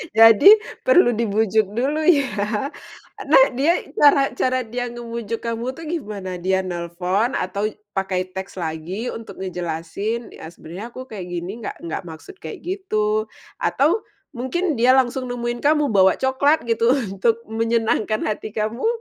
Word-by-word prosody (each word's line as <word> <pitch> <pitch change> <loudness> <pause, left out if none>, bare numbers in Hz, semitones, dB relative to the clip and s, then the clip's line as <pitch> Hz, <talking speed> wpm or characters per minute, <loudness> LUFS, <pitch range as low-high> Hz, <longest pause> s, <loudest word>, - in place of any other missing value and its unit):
jadi 225 - +7 0.4
perlu 360 - +6
dibujuk 220 -2 +1
dulu 275 +6 0
ya. 290 -6 +5 1.0
Nah, 280 -2 +7
dia, 285 +8 +1 0.2
cara 280 -2 +5
cara 255 0 +1
dia 245 +2 -4
ngebujuk 235 -1 -5
kamu 235 +2 -3
tuh 330 - -10
gimana? 205 - -5
Dia 190 +1 +1
nelpon, 180 +6 -1
atau 200 +3 -1 0.2
pakai 185 -1 -2
teks 190 +1 -7
lagi 175 +6 -4
untuk 225 0 -8
ngejelasin, 180 +6 -4
"Ya, 160 - -10
sebenernya 175 +5 -9
aku 255 - -6
kayak 190 -5 -6
gini 175 +5 -5
nggak 225 - -5
nggak 165 - -4
maksud 165 - -11
kayak 410 - -8
gitu." 215 - -1 0.3
Atau 320 +10 +2 0.3
mungkin 275 +3 -2
dia 255 +2 +5
langsung 255 0 +1
nemuin 240 -1 -3
kamu, 295 -1 +2
bawa 190 -2 +5
coklat 265 +4 +2
gitu 230 +2 +2 0.2
untuk 225 +4 0
menyenangkan 225 -1 0
hati 215 0 -4
kamu, 220 - -1
225 Hz, 140 wpm, -21 LUFS, 190-255 Hz, 1.0 s, jadi